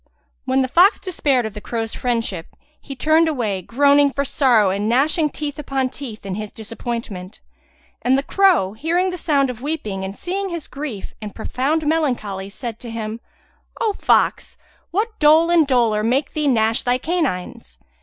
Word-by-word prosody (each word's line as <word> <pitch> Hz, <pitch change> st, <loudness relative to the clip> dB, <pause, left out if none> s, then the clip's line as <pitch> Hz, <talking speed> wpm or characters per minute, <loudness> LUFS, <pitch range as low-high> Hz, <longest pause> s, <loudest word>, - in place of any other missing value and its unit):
When 265 Hz, 0 st, +2 dB
the -, -, -1 dB
fox 360 Hz, -, +5 dB
despaired 285 Hz, -, 0 dB
of 220 Hz, -, -5 dB
the 210 Hz, -, -8 dB
crow's 225 Hz, 0 st, -3 dB
friendship, 230 Hz, -9 st, -2 dB, 0.3 s
he 275 Hz, -, -8 dB
turned 315 Hz, +5 st, +3 dB
away, 225 Hz, -11 st, -1 dB
groaning 280 Hz, +6 st, +4 dB
for 280 Hz, +1 st, -1 dB
sorrow 245 Hz, -8 st, +3 dB
and 205 Hz, +3 st, -1 dB
gnashing 300 Hz, +6 st, +2 dB
teeth 290 Hz, -1 st, -5 dB
upon 270 Hz, -3 st, -1 dB
teeth 245 Hz, -7 st, -9 dB
in 195 Hz, -, -4 dB
his 210 Hz, +1 st, -5 dB
disappointment; 220 Hz, -4 st, -6 dB, 0.6 s
and 260 Hz, +2 st, +3 dB
the 275 Hz, -, -1 dB
crow, 345 Hz, -, +3 dB
hearing 345 Hz, +10 st, 0 dB
the -, -, -4 dB
sound 280 Hz, -6 st, +1 dB
of 240 Hz, -1 st, -11 dB
weeping 235 Hz, -10 st, -3 dB
and 195 Hz, +1 st, -6 dB
seeing 385 Hz, +2 st, -3 dB
his 340 Hz, -4 st, -5 dB
grief 275 Hz, -8 st, -6 dB
and 210 Hz, -2 st, -7 dB
profound 280 Hz, +7 st, -1 dB
melancholy, 245 Hz, -11 st, -1 dB
said 230 Hz, +1 st, -7 dB
to 240 Hz, -, -8 dB
him, 225 Hz, 0 st, -5 dB, 0.6 s
"O 435 Hz, -2 st, +1 dB
fox, -, -, +1 dB, 0.3 s
what 430 Hz, +5 st, -2 dB
dole 315 Hz, +3 st, +5 dB
and 330 Hz, -4 st, +4 dB
dolour 235 Hz, -5 st, +2 dB
make 260 Hz, +6 st, 0 dB
thee 300 Hz, -1 st, 0 dB
gnash 225 Hz, -3 st, +2 dB
thy 245 Hz, 0 st, +1 dB
canines?" 255 Hz, -, -3 dB
260 Hz, 170 wpm, -20 LUFS, 220-305 Hz, 0.6 s, fox